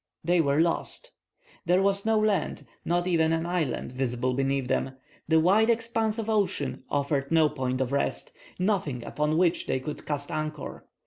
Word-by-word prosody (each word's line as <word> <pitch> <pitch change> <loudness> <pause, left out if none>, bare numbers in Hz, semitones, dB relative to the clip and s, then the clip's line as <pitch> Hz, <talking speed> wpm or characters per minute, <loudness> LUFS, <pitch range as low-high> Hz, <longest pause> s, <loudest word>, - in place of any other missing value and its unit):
They 175 +1 +3
were 140 -1 +1
lost! 170 - -1 0.6
There 180 +2 +4
was 200 +1 +1
no 220 0 +3
land, 200 -9 0 0.2
not 175 +1 0
even 165 -3 +2
an 165 0 0
island, 170 -8 -2
visible 125 -1 -1
beneath 135 0 0
them. 135 +1 -1 0.3
The 160 0 +4
wide 200 +7 +4
expanse 225 -1 +1
of 225 -2 -3
ocean 185 - 0
offered 140 0 -1
no 160 -2 +5
point 130 -3 -2
of 130 0 -1
rest, 140 - -1 0.3
nothing 180 - -1
upon 150 +5 0
which 175 -1 +2
they 130 - 0
could 150 +3 -7
cast 145 -1 -3
anchor. 155 0 -5
160 Hz, 170 wpm, -27 LUFS, 140-190 Hz, 0.6 s, no